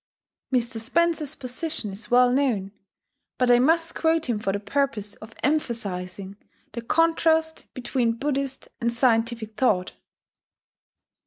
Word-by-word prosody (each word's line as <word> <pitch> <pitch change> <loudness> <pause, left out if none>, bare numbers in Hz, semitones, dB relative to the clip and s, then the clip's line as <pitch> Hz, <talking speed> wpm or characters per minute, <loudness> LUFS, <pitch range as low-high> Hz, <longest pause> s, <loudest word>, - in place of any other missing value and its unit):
Mr. 240 -2 0
Spencer's 310 +4 +1
position 255 - -3
is 210 +2 -8
well 245 0 +5
known; 245 -8 0 0.7
but 250 -1 +3
I 240 - +6
must 330 +5 +2
quote 325 0 +1
him 235 -4 0
for 195 -2 -1
the 200 - -2
purpose 210 -1 -1
of 220 +1 -13
emphasizing 200 -9 -2 0.3
the 235 - -5
contrast 320 +3 +1
between 245 -2 0
Buddhist 275 0 -2
and 235 0 0
scientific 230 -2 +1
thought 195 -8 +2
245 Hz, 120 wpm, -25 LUFS, 220-285 Hz, 0.7 s, I